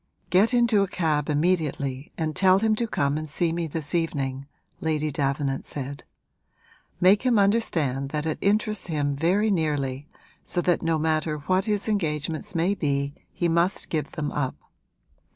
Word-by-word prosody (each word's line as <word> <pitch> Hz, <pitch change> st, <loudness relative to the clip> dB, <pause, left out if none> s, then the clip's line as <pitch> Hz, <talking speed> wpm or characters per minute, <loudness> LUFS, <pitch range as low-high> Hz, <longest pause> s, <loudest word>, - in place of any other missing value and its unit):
'Get 195 Hz, +6 st, +4 dB
into 235 Hz, -4 st, +4 dB
a 195 Hz, -, +1 dB
cab 155 Hz, -6 st, 0 dB
immediately 145 Hz, -4 st, 0 dB
and 155 Hz, -2 st, -2 dB
tell 190 Hz, -1 st, +5 dB
him 220 Hz, +2 st, +2 dB
to 235 Hz, -, 0 dB
come 140 Hz, -6 st, 0 dB
and 155 Hz, 0 st, -6 dB
see 165 Hz, +2 st, 0 dB
me 170 Hz, -1 st, -2 dB
this 155 Hz, -1 st, -3 dB
evening,' 140 Hz, -5 st, -1 dB, 0.3 s
Lady 155 Hz, -1 st, -1 dB
Davenant 140 Hz, -1 st, -1 dB
said. 140 Hz, 0 st, -6 dB, 0.9 s
'Make 190 Hz, +3 st, +5 dB
him 250 Hz, -3 st, +2 dB
understand 165 Hz, -, +1 dB
that 150 Hz, +1 st, -3 dB
it 155 Hz, -, -2 dB
interests 210 Hz, 0 st, +1 dB
him 145 Hz, -4 st, -1 dB
very 190 Hz, +8 st, +2 dB
nearly, 145 Hz, -5 st, -1 dB, 0.4 s
so -, -, -3 dB
that 175 Hz, 0 st, +1 dB
no 165 Hz, -1 st, +1 dB
matter 155 Hz, 0 st, 0 dB
what 185 Hz, +1 st, +2 dB
his 210 Hz, -1 st, -1 dB
engagements 165 Hz, -1 st, -2 dB
may 170 Hz, +4 st, +2 dB
be 140 Hz, -5 st, -1 dB, 0.2 s
he 175 Hz, -, -1 dB
must 170 Hz, +3 st, +1 dB
give 155 Hz, -3 st, -2 dB
them 150 Hz, -1 st, -3 dB
up. 135 Hz, -3 st, -2 dB
160 Hz, 160 wpm, -25 LUFS, 145-190 Hz, 0.9 s, tell